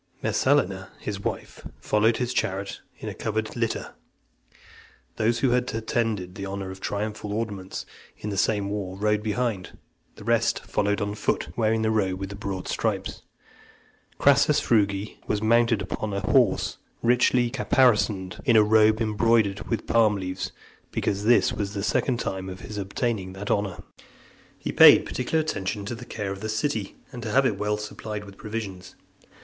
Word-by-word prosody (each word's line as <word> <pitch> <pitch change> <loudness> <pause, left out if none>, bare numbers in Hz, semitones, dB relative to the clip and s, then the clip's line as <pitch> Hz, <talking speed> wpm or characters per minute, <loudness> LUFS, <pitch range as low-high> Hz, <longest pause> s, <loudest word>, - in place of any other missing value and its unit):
Messalina, 95 +1 +1
his 100 -2 -4
wife, - - -5 0.2
followed 110 +2 +2
his 125 0 -1
chariot 100 -4 -2 0.2
in - - -8
a - - -3
covered 110 0 -3
litter. 115 -2 -2 1.2
Those 115 +2 +1
who 130 - +3
had 125 0 +1
attained 110 -5 -1
the 100 - -7
honour 95 -1 -4
of 95 - -9
triumphal 105 0 -3
ornaments 105 -3 -4 0.3
in 105 - -5
the - - -3
same 100 0 +1
war, 95 -2 -4
rode 105 +1 +1
behind; 105 -2 -2 0.4
the - - -12
rest - - +1
followed 105 0 0
on 100 0 -1
foot, 105 - -1
wearing 110 -1 +1
the 110 - +2
robe 95 -4 0
with 95 0 -4
the 100 - -7
broad 100 -2 -5
stripes. - - -2 1.0
Crassus - - +5
Frugi 100 -2 +1
was 105 - 0
mounted 115 -2 +3
upon 105 +2 -4
a 100 - -1
horse - - +2 0.2
richly 120 0 +3
caparisoned, 110 -8 +2
in 120 -5 +3
a 110 - +7
robe 110 +1 +4
embroidered 110 -2 +2
with 115 -2 -1
palm 110 -3 +4
leaves, 95 -1 -4 0.4
because 100 +1 -1
this 120 +2 +4
was 100 0 -3
the 100 - -2
second 120 +3 +1
time 95 -4 -3
of 95 0 -8
his 105 -1 -6
obtaining 100 -1 -2
that 100 +2 -4
honour. 100 -3 0
XVIII. - - -12 0.7
He - - -4
paid - - +8
particular 130 +5 -1
attention 100 -7 -3
to 105 - -4
the 120 +1 -8
care 105 -4 -4
of 100 0 -6
the 110 - -3
city, 110 -3 -2 0.2
and 125 -3 -7
to 110 - -4
have 135 +5 +3
it 105 -6 0
well 105 0 0
supplied 105 0 -6
with 100 -1 -12
provisions. 105 -4 -6
105 Hz, 170 wpm, -25 LUFS, 100-115 Hz, 1.2 s, paid